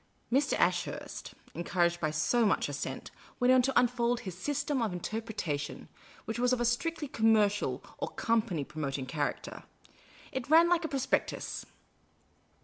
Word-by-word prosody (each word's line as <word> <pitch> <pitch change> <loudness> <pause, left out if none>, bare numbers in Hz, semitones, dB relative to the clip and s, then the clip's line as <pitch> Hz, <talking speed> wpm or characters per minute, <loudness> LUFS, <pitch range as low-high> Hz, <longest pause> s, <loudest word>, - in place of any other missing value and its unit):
Mr. 280 +2 +3
Ashurst, - - -1 0.2
encouraged 175 0 +1
by 155 - 0
so 155 +10 +2
much 205 - +2
assent, 145 0 -5 0.3
went 250 0 +5
on 255 - +6
to 270 +2 +3
unfold 240 0 +1
his 185 -5 -6
System 285 +6 -1
of 220 -3 0
Interpretation, 180 -7 -4 0.4
which 225 +2 -3
was 250 0 +3
of 255 - +2
a 240 - +1
strictly 295 +6 0
connnercial 220 -4 +2 0.2
or - - -1
company 220 -9 0
promoting 140 -2 -4
character. 145 +2 -3 0.7
It 260 0 -4
ran 330 +2 +7
like 350 -1 +3
a - - 0
prospectus. 270 -2 -1
230 Hz, 140 wpm, -31 LUFS, 175-255 Hz, 0.7 s, ran